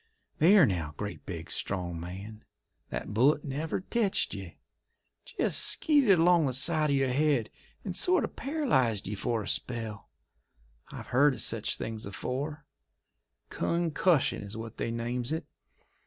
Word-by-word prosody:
"There 185 +2 +7
now, 85 - -2
great, 105 0 -6
big, 85 -2 -6
strong 90 -3 -3
man! 95 +6 -8 0.5
That - - -5
bullet 140 +7 +3
never 150 +6 -3
tetched 210 0 0
ye! 95 -4 -8 0.7
Jest - - +1
skeeted 275 - +4
along 170 -2 +4
the 130 - -1
side 155 +3 0
of 140 - +2
your 135 -1 +2
head 135 -4 +1 0.3
and 185 -3 -4
sort 365 - +3
of - - -5
paralysed 220 - 0
ye 105 - -3
for 115 +2 -1
a - - -8
spell. 115 -4 -3 0.8
I've - - -9
heerd 140 +2 +4
of - - -3
sech 110 -2 -1
things 110 -2 -3
afore; 145 - -4 0.8
cun 170 -1 -1
cussion 160 -1 +2
is 100 +1 -7
what 115 0 -8
they - - -2
names 120 +2 -3
it. 160 - -2
130 Hz, 150 wpm, -29 LUFS, 105-160 Hz, 0.8 s, There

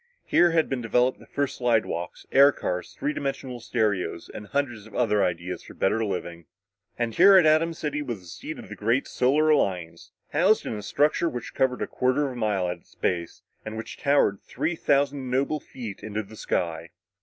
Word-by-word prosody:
Here 175 - +4
had 165 -1 +2
been 135 -2 -2
developed 125 +3 +1
the - - -16
first 140 -1 -2
slidewalks, 110 -8 -1
air 140 +1 +7
cars, 90 -8 -4
three 150 - -1
dimensional 135 -3 -4
stereos 105 -7 -1
and 105 - -8
hundreds 120 -5 -2
of 110 - -14
other 105 -4 +2
ideas 90 0 -2
for - - -13
better 110 +4 +1
living. 85 -4 -4 0.5
And 120 -1 -1
here 190 - +8
at 180 - +6
Atom 160 +2 +3
City 150 -1 -3
was 120 -7 -4
the - - -17
seat 85 - -7
of - - -10
the - - -7
great 115 +6 +1
Solar 145 +5 +2
Alliance, 90 - 0 0.2
housed 190 +8 +3
in - - -3
a 105 - -5
structure 150 - +1
which 120 -4 -6
covered 130 -1 +1
a - - -3
quarter 130 +3 +1
of 135 - -3
a - - -8
mile 105 -6 0
at 90 - -3
its - - -26
base 85 -2 -2 0.2
and 110 0 -6
which 115 +1 -6
towered 140 -9 +2
three 155 +7 -2
thousand 140 -3 +1
noble 140 +4 0
feet 115 -7 -8
into 110 0 -3
the 110 +2 -13
sky. 85 -5 -2
120 Hz, 200 wpm, -26 LUFS, 100-145 Hz, 0.5 s, here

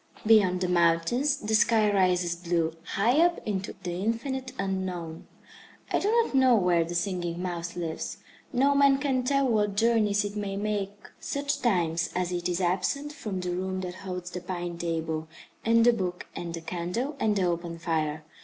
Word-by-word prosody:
Beyond 200 -5 +5
the 180 - +1
mountains 175 - +2
the 215 +1 -3
sky 215 -1 +4
rises 180 -3 +2
blue, 170 -2 -1 0.2
high 235 +9 +3
up 345 0 +2
into 195 -2 -3
the 180 - -3
infinite 260 +4 -2
Unknown. 185 -4 -3 0.6
I - - +2
do 405 - 0
not 460 -4 +2
know 260 -2 +5
where 180 -5 +3
the 170 +1 -6
Singing 175 -1 -2
Mouse 175 -1 -4
lives. 165 -2 -4 0.3
No 275 +2 +3
man 280 -1 +5
can 270 -2 0
tell 275 +1 +2
what 210 -4 +1
journeys 210 -2 +3
it 205 0 -5
may 200 -2 -3
make 205 -1 -3
such 280 0 -2
times 170 -7 +1
as 180 0 -1
it 175 0 -2
is 175 0 -1
absent 195 +12 0
from 210 -10 -4
the 180 0 -2
room 185 +1 -2
that 180 -1 -5
holds 180 -2 -5
the 180 - -5
pine 175 -1 -4
table, 160 -2 -2 0.4
and 230 0 +4
the 240 - +6
book, 180 -5 -3
and 170 -1 -5
the 165 - -6
candle, 180 - -3
and 215 -1 +2
the 195 - +1
open 170 -1 -2
fire. 155 -2 -1
190 Hz, 180 wpm, -27 LUFS, 175-230 Hz, 0.6 s, the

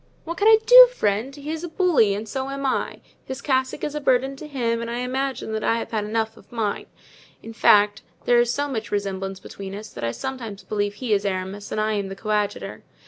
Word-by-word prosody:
"What 335 +1 -5
can 410 - +3
I 445 0 +8
do, - - +10
friend? 215 - -1
he 290 +1 -6
is 320 +1 -4
a - - -3
bully 310 - +3
and 215 +2 -5
so 265 +4 -3
am 275 0 -4
I; 260 - -1 0.2
his 265 0 -6
cassock 260 0 -1
is 295 - -2
a 300 - -3
burden 265 0 +2
to 310 - -9
him 235 -5 -1
and 235 - -4
I 235 - -3
imagine 250 -4 -2
I 230 - +2
have - - -5
had 215 -2 -1
enough 220 +1 -2
of - - -19
mine; 220 -4 -2 0.6
in 225 - -8
fact, 205 -2 +4 0.2
there 240 -1 +5
is 240 0 +2
so 285 +3 -1
much 225 -6 -4
resemblance 195 -1 -3
between 195 0 -8
us 210 +1 -8
that - - -9
I 115 - 0
sometimes 230 - -6
believe 205 -1 -2
he 235 -1 -1
is 200 -1 +1
Aramis 195 +1 -4
and - - -2
I 215 0 +1
am 200 -2 -2
the 195 - -7
coadjutor. 210 0 -2
230 Hz, 230 wpm, -23 LUFS, 205-270 Hz, 0.6 s, do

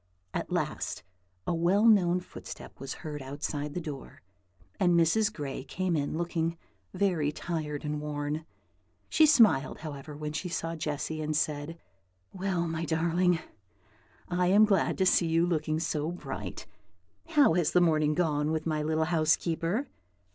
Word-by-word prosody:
At - - -3
last, - - -2 0.4
a - - 0
well 175 +6 +3
known 180 -5 +5
footstep - - -10
was 135 0 -5
heard 150 -2 -5
outside 145 +2 -4
the - - 0
door, 150 - -8 0.6
and 175 -2 +4
Mrs. 210 +6 +3
Gray 140 -8 -5
came 180 +4 -1
in, 145 +1 -1
looking 170 -1 -1 0.3
very 180 -6 +1
tired 155 -3 -4
and 150 0 -2
worn. 150 +1 -3 0.7
She 315 - +5
smiled, 220 - +4
however, 145 -1 -7
when 150 0 -4
she 180 +3 -3
saw 165 -1 -3
Jessy, 155 0 -3
and 155 0 -1
said, 150 +2 -2 0.6
"Well, 185 -2 -1
my 165 0 -3
darling, 170 +2 +1 0.9
I 180 0 +1
am 205 +4 +6
glad 200 -2 +2
to 190 - +2
see 175 -2 +4
you 165 +1 +3
looking 155 -2 0
so 155 -1 -1
bright. 105 - -6 0.6
How 295 - +5
has 170 -2 +2
the 180 - +4
morning 155 -3 +3
gone 150 -3 +1
with 160 -1 -2
my 155 -2 0
little 160 +1 +1
housekeeper?" 165 - +1
160 Hz, 150 wpm, -29 LUFS, 150-180 Hz, 0.9 s, am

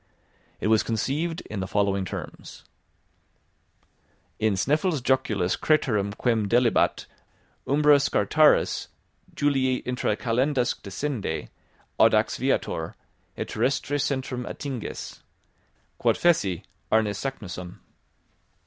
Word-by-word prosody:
It - - -4
was 110 0 +4
conceived 145 - -2
in 105 - -6
the 95 - -3
following 100 -1 +1
terms: - - -8 1.7
In 110 -2 +2
Sneffels 150 - +1
Joculis 110 -8 +1
craterem 105 -10 +1
quem 115 -4 +1
delibat 120 +2 +2 0.6
Umbra 145 +1 +5
Scartaris 150 +2 +3 0.5
Julii 130 -3 +1
intra 125 -4 0
calendas 125 +1 +1
descende, 105 - -3 0.5
Audax - - +4
viator, 80 0 -1 0.4
et - - -4
terrestre 140 +2 0
centrum 130 -2 -2
attinges. 135 -6 -6 0.8
Quod - - +2
feci, 100 - +2 0.3
Arne 110 -2 +3
Saknussemm. 95 -7 -6
125 Hz, 95 wpm, -25 LUFS, 100-140 Hz, 1.7 s, Umbra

